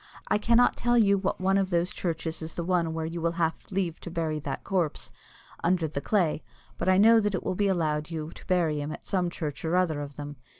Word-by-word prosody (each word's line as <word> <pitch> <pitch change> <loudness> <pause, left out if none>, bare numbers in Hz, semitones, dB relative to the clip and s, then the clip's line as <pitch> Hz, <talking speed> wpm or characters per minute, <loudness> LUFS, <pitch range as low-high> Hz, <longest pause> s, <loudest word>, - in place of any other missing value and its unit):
I - - +3
cannot 235 +3 +4
tell 240 0 +2
you 200 -3 +4
what 195 0 -2
one 190 +1 +2
of 190 -1 0
those 175 0 +1
churches 165 -2 -3
is 160 0 -6
the 170 - -2
one 170 -2 0
where 160 -1 -2
you 165 +1 -4
will 170 0 0
have 165 -1 +1 0.2
leave 185 -4 -2
to - - -8
bury 160 -2 -2
that 140 -2 -5
corpse 180 -6 -1 0.5
under 170 -1 +2
the 140 -2 -4
clay, 175 -6 +1 0.4
but - - +1
I 185 - +5
know 225 +3 +7
that 205 -2 0
it - - -3
will - - -1
be 200 +2 +1
allowed 155 -5 0
you 160 -1 -5
to - - -14
bury 165 -5 +1
him 145 +1 -4
at - - -8
some 180 -3 0
church 155 -4 -5
or 165 +2 0
other 165 -5 +1
of 145 -1 -7
them. 145 -1 -7
170 Hz, 245 wpm, -27 LUFS, 160-190 Hz, 0.5 s, know